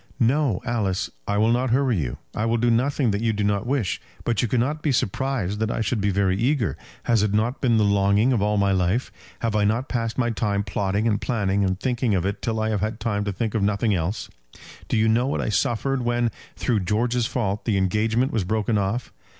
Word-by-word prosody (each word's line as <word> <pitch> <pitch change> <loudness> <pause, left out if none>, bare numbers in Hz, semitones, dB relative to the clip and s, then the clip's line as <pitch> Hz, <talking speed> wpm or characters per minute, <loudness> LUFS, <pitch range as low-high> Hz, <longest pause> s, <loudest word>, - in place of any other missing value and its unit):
"No, 130 -3 +2
Alice, 105 -7 -1 0.2
I 100 - 0
will 110 +2 +3
not 125 +2 +1
hurry 125 -2 +2
you. 65 -6 -3 0.2
I 110 - -1
will 115 +1 +1
do 120 +1 +2
nothing 130 +1 +2
that 100 +1 -1
you 115 -1 +1
do 105 0 -1
not 100 +2 0
wish. 125 - -1 0.2
But 115 -3 0
you 120 - +1
cannot 130 +7 0
be 150 - +1
surprised 115 -4 -1
that 110 0 0
I 115 - -1
should 110 -1 -1
be 100 - +1
very 95 -1 +1
eager. 120 +2 +1 0.3
Has 115 -3 +2
it 105 -1 +1
not 115 +5 0
been 120 -4 +3
the 110 - +3
longing 100 +4 +3
of 115 - +1
all 105 +1 +1
my 100 -1 +2
life? 95 +6 0 0.3
Have 115 -2 -1
I 105 - +3
not 110 +6 0
passed 115 -2 -2
my 120 -2 +1
time 105 -3 -1
plotting 100 +3 -1
and 105 -2 +1
planning 100 -4 0
and 95 -1 0
thinking 120 -3 0
of 90 -1 0
it 100 +1 -2
till 110 -1 -1
I 110 0 0
have 105 -3 -1
had 110 +1 -2
time 105 -4 -1
to 100 - -1
think 110 +2 -2
of 110 - 0
nothing 105 +2 +1
else? 90 +3 -2 0.6
Do - - 0
you 110 +1 +3
know 120 +3 +2
what 140 - -1
I - - -1
suffered 125 +5 0
when, 120 -1 0 0.2
through 115 -4 0
George's 115 +5 0
fault, 105 -4 -2
the 110 -4 +1
engagement 110 +6 +1
was 110 - +1
broken 110 +2 0
off? 100 +5 -2
110 Hz, 230 wpm, -24 LUFS, 100-120 Hz, 0.6 s, will